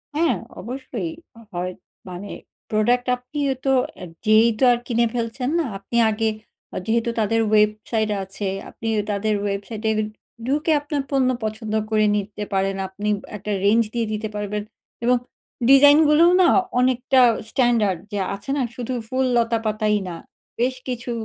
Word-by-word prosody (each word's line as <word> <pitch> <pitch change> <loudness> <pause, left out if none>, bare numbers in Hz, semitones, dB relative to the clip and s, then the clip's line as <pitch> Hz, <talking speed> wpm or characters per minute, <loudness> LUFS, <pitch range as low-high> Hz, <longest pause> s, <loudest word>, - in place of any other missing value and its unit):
হ্যাঁ। 310 -5 +2 0.3
অবশ্যই 260 - -5 0.4
হয়। 180 +1 -3 0.4
মানে, 180 +3 -7 0.4
প্রোডাক্ট 240 +4 +2
আপনিও 270 +2 -2
তো 270 - +3 0.2
এ্যা 180 - -8 0.2
যেয়েই 220 +2 +5
তো - - +1
আর 240 - +3
কিনে 235 -1 +2
ফেলছেন 240 +2 -2
না। 330 - 0
আপনি 195 +4 -4
আগে, 220 +1 0 0.5
আ - - -2
যেহেতু 230 +1 +1
তাদের 225 +1 +2
ওয়েবসাইট 215 +1 +2
আছে, 195 +1 -5 0.2
আপনি 225 - -7 0.2
তাদের 210 +1 0
ওয়েবসাইটে 205 +2 -3 0.6
ঢুকে 295 +4 +1
আপনার 290 0 -2
পণ্য 265 -2 +3
পছন্দ 215 0 -4 0.2
করে 215 -1 +3
নিতে 210 0 -3
পারেন। 195 0 +1
আপনি 205 +3 -4 0.3
একটা 210 +1 -5
রেঞ্জ 225 +3 +5
দিয়ে 235 -2 -1
দিতে 215 +1 -3
পারবেন 210 0 -3 0.4
এবং 250 +1 +4 0.5
ডিজাইনগুলোও 300 +4 +7
না, 350 - +6 0.3
অনেকটা 255 +1 +3 0.3
স্ট্যান্ডার্ড 225 -8 +2
যে 205 - -2 0.2
আছে 200 +5 -12
না, - - +1
শুধু 250 +1 -4
ফুল 260 +2 0
লতাপাতাই 220 -2 +1
না। 170 - -5 0.4
বেশ 255 +2 +1
কিছু 245 -1 -4
225 Hz, 145 wpm, -22 LUFS, 210-255 Hz, 0.6 s, ডিজাইনগুলোও